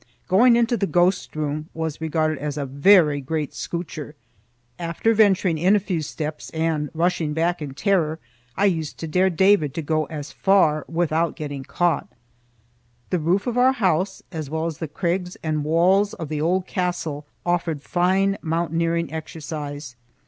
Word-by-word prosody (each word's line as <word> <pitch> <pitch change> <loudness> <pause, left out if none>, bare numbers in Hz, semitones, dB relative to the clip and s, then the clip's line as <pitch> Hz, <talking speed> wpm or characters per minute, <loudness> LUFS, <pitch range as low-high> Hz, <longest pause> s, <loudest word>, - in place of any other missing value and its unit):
Going 235 +6 +5
into 235 0 +2
the 200 - 0
ghost 180 -1 +1
room 155 0 -3
was 160 -1 -4
regarded 155 -2 0
as 150 0 -4
a 145 - -2
very 145 +1 +4
great 150 +1 -3
scootcher. 155 -4 -5 0.6
After 170 +6 0
venturing 195 -6 +3
in 185 +5 +4
a - - +4
few 185 -4 -2
steps 150 0 -5
and 160 -2 0
rushing 165 -2 0
back 170 +1 0
in 140 -3 -6
terror, 165 -4 +1 0.4
I 200 - +3
used 165 -6 0
to 165 - -5
dare 185 +4 +2
David 175 -5 +3
to 165 - -3
go 155 +1 0
as 150 -2 -7
far 160 -7 +3
without 165 0 0
getting 145 -3 -5
caught. 175 +5 0 1.0
The 180 - +1
roof 175 +6 +1
of 245 -1 0
our 260 +1 +5
house, 190 -4 0
as 155 -5 -5
well 160 +1 -2
as 165 -3 -4
the 160 - -3
crags 180 +3 -2
and 155 -2 -1
walls 185 +6 +3
of 160 -3 -6
the 150 -1 -2
old 180 +3 +1
castle, 175 -6 -3 0.2
offered 170 -4 -1
fine 190 +3 +1
mountaineering 165 0 -1
exercise. 150 -4 -6
165 Hz, 165 wpm, -23 LUFS, 155-185 Hz, 1.0 s, Going